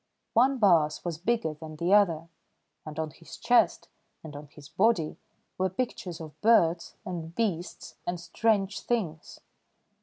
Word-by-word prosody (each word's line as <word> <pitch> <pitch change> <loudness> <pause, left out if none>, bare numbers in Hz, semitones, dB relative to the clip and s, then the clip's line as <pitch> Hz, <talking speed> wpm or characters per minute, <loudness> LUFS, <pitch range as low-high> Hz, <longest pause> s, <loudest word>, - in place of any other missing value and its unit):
One 265 +3 +4
baas 170 -10 +3
was 165 -3 -3
bigger 225 -4 0
than 155 0 -10
the 170 +5 +1
other, 170 -6 +4 0.6
and 155 0 -7
on 160 -1 -2
his - - -12
chest - - +3 0.4
and 155 -2 -9
on 145 +1 -9
his 145 0 -14
body 185 -5 +1 0.4
were 190 0 +2
pictures 185 -5 -4
of 155 -2 -10
birds, 175 -7 +3
and 170 -2 -6
beasts, 185 -6 -3
and 175 0 -2
strange 195 +2 0
things. 180 -10 -3
175 Hz, 145 wpm, -28 LUFS, 160-205 Hz, 0.6 s, One